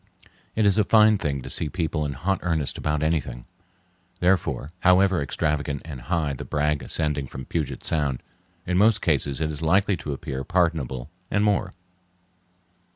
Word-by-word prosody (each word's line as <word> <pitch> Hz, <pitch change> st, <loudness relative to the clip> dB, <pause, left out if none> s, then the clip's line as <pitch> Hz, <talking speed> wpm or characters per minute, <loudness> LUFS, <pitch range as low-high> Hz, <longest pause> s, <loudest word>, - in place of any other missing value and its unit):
It 110 Hz, -, +2 dB
is 100 Hz, +1 st, +4 dB
a -, -, +5 dB
fine 110 Hz, 0 st, +5 dB
thing 70 Hz, -5 st, -2 dB
to -, -, -7 dB
see 75 Hz, -, 0 dB
people 80 Hz, -3 st, -1 dB
in 70 Hz, -, -4 dB
hot 95 Hz, +9 st, -1 dB
earnest 80 Hz, -5 st, -1 dB
about 75 Hz, 0 st, -1 dB
anything; 70 Hz, -7 st, -1 dB, 0.7 s
therefore, 85 Hz, -7 st, +1 dB
however 95 Hz, -1 st, +4 dB
extravagant 75 Hz, -1 st, -1 dB
and 70 Hz, -6 st, -7 dB
high 75 Hz, +3 st, -1 dB
the 70 Hz, +2 st, -6 dB
brag 75 Hz, -1 st, 0 dB
ascending 75 Hz, -4 st, -1 dB
from 65 Hz, 0 st, -8 dB
Puget 80 Hz, -2 st, -3 dB
Sound, 75 Hz, -5 st, 0 dB, 0.4 s
in 90 Hz, 0 st, +1 dB
most 110 Hz, +1 st, +4 dB
cases 70 Hz, -2 st, +1 dB
it 80 Hz, 0 st, 0 dB
is 75 Hz, 0 st, -4 dB
likely 95 Hz, +5 st, +3 dB
to 80 Hz, -, -5 dB
appear 65 Hz, -1 st, -4 dB
pardonable 80 Hz, -8 st, -1 dB, 0.2 s
and 105 Hz, -, +1 dB
more. 100 Hz, -2 st, +1 dB
80 Hz, 160 wpm, -24 LUFS, 70-90 Hz, 0.7 s, a